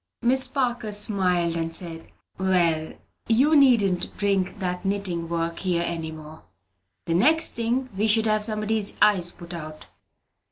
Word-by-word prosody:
Miss 260 +2 +6
Parker 245 -5 -2
smiled, 185 -5 +1
and 165 0 -3
said, 165 -1 -7 0.3
"Well, 170 -4 +1 0.3
you 265 +7 +3
needn't 230 -10 +2
bring 195 -1 -1
that 180 -2 -4
knitting 190 -4 -2
work 170 0 -3
here 175 -3 -1
any 165 -2 -4
more. 155 0 -12 0.6
The 165 - -2
next 315 - +3
thing 235 +3 -2
we 210 +3 0
should 220 +1 +2
have 215 -1 +1
somebody's 215 -1 -2
eyes 185 -5 +3
put 175 0 -12
out." 155 -2 -9
190 Hz, 145 wpm, -24 LUFS, 170-220 Hz, 0.6 s, Miss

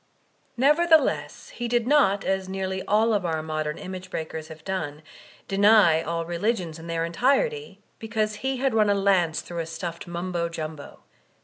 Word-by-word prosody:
Nevertheless, 315 +5 +2
he 240 - -5
did 240 -1 +1
not, 205 -8 +3
as 190 -1 -1
nearly 190 0 -3
all 220 +2 +3
of 205 -3 +1
our 160 -2 -1
modem 155 -1 -3
image 185 0 -7
breakers 160 -2 -5
have 160 -1 -12
done, 160 -6 -4 0.4
deny 200 -5 +5
all 165 0 -3
religions 175 -1 -2
in 165 - -10
their 165 0 -1
en 170 - -6
tirety, 440 - +1 0.2
because 215 -1 -2
he 265 +4 -2
had 265 -1 0
run 215 -2 +3
a 200 - +3
lance 190 -5 +2
through 170 -1 -7
a 165 - -3
stuffed 170 +1 -6
Mumbo 175 0 -3
Jumbo. 155 -3 -7
190 Hz, 170 wpm, -25 LUFS, 165-220 Hz, 0.4 s, deny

